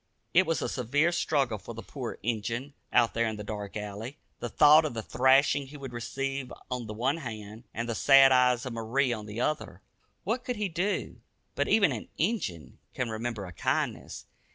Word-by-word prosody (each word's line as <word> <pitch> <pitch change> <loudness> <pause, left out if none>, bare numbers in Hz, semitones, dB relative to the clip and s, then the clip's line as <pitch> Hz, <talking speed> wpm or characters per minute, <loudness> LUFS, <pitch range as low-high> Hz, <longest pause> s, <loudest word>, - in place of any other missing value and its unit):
It 185 0 +5
was 165 - 0
a - - 0
severe 145 +7 +1
struggle 140 -10 0
for - - -9
the - - -7
poor - - -6
"Injun," 115 +5 -2 0.2
out 120 -2 +4
there 115 0 +1
in 110 - -3
the 105 - -6
dark 105 0 -5
alley. 105 +6 -6 0.2
The - - -4
thought 150 +1 +7
of 150 -6 -3
the 110 - -3
thrashing 135 +3 +3
he 145 +2 -10
would 135 -3 -8
receive 135 +2 -3 0.2
on 125 -2 -3
the 105 - -5
one 130 +7 0
hand, 110 -5 -8
and 115 +1 -4
the 115 - -1
sad 135 +3 +7
eyes 125 -1 +4
of 125 - -4
Marie 120 +3 0
on 110 -2 -6
the 105 +2 -6
other. 155 +4 -2 0.4
What 245 +2 -1
could 250 - -3
he 210 -2 -2
do? 180 +5 -2 0.4
But - - 0
even 200 -7 +4
an 115 -5 -5
"Injun" 160 - -2 0.2
can 125 -3 -2
remember 110 -2 -3
a 90 - -9
kindness. - - -2
125 Hz, 200 wpm, -29 LUFS, 110-145 Hz, 0.4 s, thought